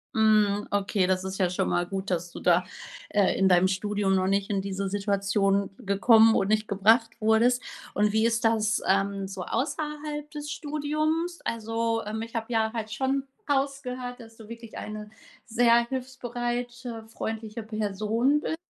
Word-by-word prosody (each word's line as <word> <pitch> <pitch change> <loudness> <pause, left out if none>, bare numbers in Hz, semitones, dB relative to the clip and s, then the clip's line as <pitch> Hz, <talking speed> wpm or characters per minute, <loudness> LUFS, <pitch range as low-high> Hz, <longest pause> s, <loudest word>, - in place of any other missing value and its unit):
Mhm. 215 -2 +3
Okay, 200 -1 +1
das 185 0 0
ist 190 0 -4
ja 185 -2 +3
schon 180 - -1
mal 175 - +1
gut, 195 +2 -4
dass 175 -1 -2
du - - -8
da, 180 0 +3 0.5
äh, 205 -2 +2
in 190 0 +4
deinem 180 0 +5
Studium 195 +1 0
noch 185 0 +1
nicht 195 0 +1
in 200 -2 0
diese 195 0 -3
Situation 200 0 +1
gekommen 225 +1 +5
und 195 - +2
nicht 215 +1 +1
gebracht 220 +3 +4
wurdest. 230 +3 +3 0.3
Und 210 0 +2
wie 220 +1 +3
ist 230 0 +1
das, 220 -1 +2
ähm, 195 0 +1
so 190 -1 -6
außerhalb 295 - -3
des 295 0 -6
Studiums? 310 +3 -1
Also, 225 0 -1
ähm, 215 +1 -4
ich 230 0 -7
habe 225 -1 -2
ja 220 -1 +2
halt 220 -2 -4
schon 270 +3 0 0.2
rausgehört, 265 -3 -2
dass 225 -1 -14
du 220 - -12
wirklich 230 0 -10
eine 210 0 -6 0.4
sehr 235 0 +4
hilfsbereite, 245 -2 -4
freundliche 220 0 -5
Person 215 +5 0
bist. 320 - -2
220 Hz, 165 wpm, -27 LUFS, 200-245 Hz, 0.5 s, deinem